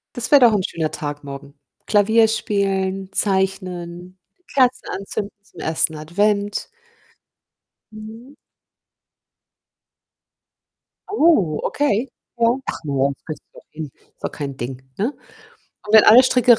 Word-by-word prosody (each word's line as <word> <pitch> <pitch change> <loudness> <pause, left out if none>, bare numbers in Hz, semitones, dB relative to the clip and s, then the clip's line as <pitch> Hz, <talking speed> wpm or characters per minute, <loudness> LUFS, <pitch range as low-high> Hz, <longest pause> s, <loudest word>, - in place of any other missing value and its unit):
Das 245 -1 -2
wäre 285 - +7
doch 235 -2 +7
'n 205 -3 +1
schöner 160 -3 -2
Tag 145 -1 -5
morgen. 140 0 -9 0.3
Klavier 220 +2 +4
spielen, 195 -3 -1
zeichnen, 185 -2 -1 0.4
Kerzen 255 -2 +2
anzünden 200 +1 -4
zum - - -15
1. 160 0 +1
Advent. 200 +6 0 1.2
Mhm. 220 +5 -11 2.8
Oh, 310 - +3
okay, 265 -3 0 0.3
ja. 230 0 +4 0.2
Ach - - -5
morgens, 140 -1 0
kriegst 155 - -7
du - - -16
doch - - -17
hin. 155 -2 -7
Ist - - -29
doch - - -1
kein 140 -3 -5
Ding, 125 +1 -6 0.2
ne, 235 +8 -1 0.7
und 210 - -6
wenn 220 - +9
alle 235 +4 +9
Stricke 250 -2 +5
195 Hz, 125 wpm, -21 LUFS, 160-220 Hz, 2.8 s, wenn